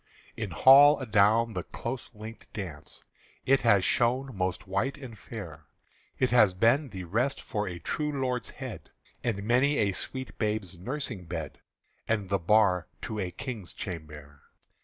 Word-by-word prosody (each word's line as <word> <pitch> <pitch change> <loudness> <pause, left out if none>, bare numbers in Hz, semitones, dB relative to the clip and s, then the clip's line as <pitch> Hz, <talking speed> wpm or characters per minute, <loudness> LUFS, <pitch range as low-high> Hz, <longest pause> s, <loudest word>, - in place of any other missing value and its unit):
In 110 -3 -4
hall 140 - +7
adown 110 -1 +3
the - - -2
close 120 +2 -6
linked 110 +2 -10
dance 90 -9 -7 0.4
It 135 +1 +4
has 100 -6 +4
shone 125 +1 +1
most 95 0 -2
white 100 +9 -1
and 130 -5 -9
fair; 85 -10 -9 0.5
It 130 -2 +1
has 105 -6 +5
been 130 +9 +3
the 95 -4 -7
rest 120 +10 0
for 105 -3 -3
a 90 -2 -5
true 150 - -2
lord's 130 -4 -2
head, - - -8 0.3
And 105 -4 -1
many 130 +6 +3
a 100 -2 +2
sweet 130 +6 -5
babe's 105 -4 -1
nursing 115 - -4
bed, 80 -4 -6 0.5
And 105 -4 -1
the 100 0 +1
bar 90 -1 +3 0.2
to 110 -1 -4
a 95 -3 -2
King's 105 -1 -7
chambère. 75 -5 -8
110 Hz, 155 wpm, -28 LUFS, 95-125 Hz, 0.5 s, hall